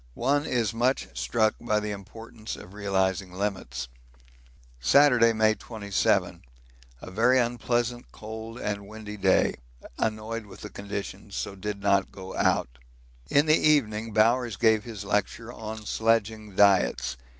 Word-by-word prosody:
One 145 +4 +1
is 115 -3 0
much 125 +4 0
struck 110 -2 +1
by 105 -3 +1
the 105 0 -4
importance 110 +2 -8
of 90 - -12
realising 95 -2 -1
limits. 90 -10 -3 0.9
Saturday, 120 - +5
May 110 -1 +3
27. 105 -3 -1 0.6
A - - -8
very 120 +6 +4
unpleasant, 120 0 -1
cold, 110 +2 -8 0.2
windy 105 +1 -9
day. 95 -2 +3 0.5
Annoyed 110 0 -2
with 100 - -13
the 105 - -8
conditions, 100 -1 -6
so - - -3
did 100 +1 -5
not 100 -1 +2
go 95 -1 -9
out. - - 0 0.5
In 145 +2 +4
the 155 - +4
evening 115 -9 +2
Bowers 115 +1 +3
gave 110 -2 +3
his 110 -4 -7
lecture 105 +3 -1
on 110 -1 -7
sledging 110 -2 0
diets. 95 -10 +3
110 Hz, 130 wpm, -27 LUFS, 100-115 Hz, 0.9 s, Saturday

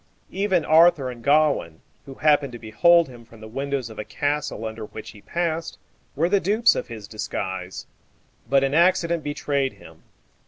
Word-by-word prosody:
Even 190 -5 0
Arthur 160 -4 +4
and 120 -1 -12
Gawain, 145 - +2 0.3
who 135 - -9
happened 145 -3 +2
to - - -6
behold 165 +10 +3
him 120 -3 -13
from 115 -1 -17
the 110 - -10
windows 135 +1 -3
of 110 - -11
a - - -3
castle 145 +1 -3
under 110 0 -6
which 110 - -10
he 105 - -16
passed, 165 +2 -3 0.4
were 160 +4 +1
the 200 +2 +2
dupes 215 +5 +3
of - - -4
his 110 -4 -9
disguise. 95 -4 -5 0.6
But 135 0 +4
an 135 0 0
accident 170 -1 +2
betrayed 140 -2 -1
him. - - -16
140 Hz, 170 wpm, -23 LUFS, 115-165 Hz, 0.6 s, Arthur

